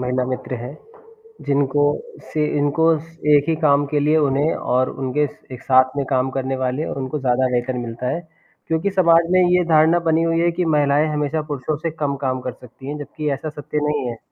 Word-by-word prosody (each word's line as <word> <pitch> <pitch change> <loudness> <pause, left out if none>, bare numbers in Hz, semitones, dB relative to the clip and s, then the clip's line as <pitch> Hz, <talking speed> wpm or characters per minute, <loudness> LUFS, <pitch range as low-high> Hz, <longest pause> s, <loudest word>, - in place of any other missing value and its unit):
महिला 125 0 -1
मित्र 130 0 -4
है। 125 +3 -6 0.7
जिनको 140 0 +1 0.5
से 155 -1 +1
इनको 145 +3 +1
स 165 +1 -16 0.2
एक 145 0 +3
ही 165 - +2
काम 145 -2 +3
के 145 +1 -1
लिए 150 +2 +3
उन्हें 145 +1 +2 0.2
और 130 +1 +2
उनके 135 +3 -1
स - - -17
एक 125 - -8
साथ 130 +1 +3
में 140 - 0
काम 130 -1 +1
करने 135 0 -2
वाले 130 +4 -1
उनको 135 +2 -4
ज़्यादा 130 -1 +1
वेतन 125 +1 -1
मिलता 120 0 -4
है, 170 - -5 0.5
क्योंकि 160 +4 0
समाज 170 -3 +4
में 185 - +5
ये 180 0 +4
धारणा 160 +2 +5
बनी 160 +1 +3
हुई 165 0 +1
है 170 0 +2
कि 175 +1 -2
महिलाएँ 145 +1 +3
हमेशा 150 +1 -1
पुरुषों 145 +1 -3
से 160 +2 -3
कम 140 -2 0
काम 130 0 0
कर 125 -1 -5
सकती 125 +2 -14
हैं, 145 +1 -4
जबकि 150 +1 -4
ऐसा 155 +3 -5
सत्य 150 0 -6
नहीं 145 -3 -1
है। 115 - -6
145 Hz, 210 wpm, -20 LUFS, 130-155 Hz, 0.7 s, में